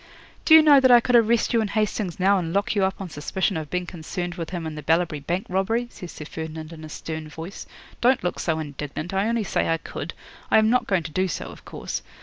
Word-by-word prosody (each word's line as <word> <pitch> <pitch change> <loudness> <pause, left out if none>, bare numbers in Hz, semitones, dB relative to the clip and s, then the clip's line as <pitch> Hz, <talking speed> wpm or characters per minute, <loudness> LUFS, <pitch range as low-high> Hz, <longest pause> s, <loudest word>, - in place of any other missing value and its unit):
'"Do 315 - +8
you 320 - +9
know 290 -2 +8
that 260 -1 +4
I 245 -1 +9
could 245 +1 +1
arrest 230 0 +4
you 230 - +4
and 215 - -1
Hastings 210 -4 -1
now 195 +1 +4
and 165 -2 -3
lock 200 +1 +1
you 200 -2 +1
up 190 0 0
on 195 - -5
suspicion 190 +7 -1
of 155 -2 -4
being 180 0 -2
concerned 175 +1 -5
with 170 -2 -5
him 175 -3 -4
in 160 - -4
the 150 - -6
Ballabri 165 0 +1
Bank 175 +7 -2
robbery?" 225 +6 0
says 180 - -9
Sir 150 - -9
Ferdinand 160 0 -7
in 160 -1 -10
a 155 - -8
stern 155 0 -6
voice. 165 +5 -8 0.3
"Don't 250 -1 +3
look 180 - -2
so 160 -2 0
indignant. 150 +2 -5
I 195 +2 +1
only 230 -1 0
say 185 - 0
I 165 - +2
could. - - -7 0.3
I - - +5
am 220 0 +4
not 250 - +2
going 190 -4 +1
to 160 - -7
do 185 +5 +1
so, 170 - -4
of - - -15
course. - - -5
180 Hz, 255 wpm, -24 LUFS, 160-215 Hz, 0.3 s, you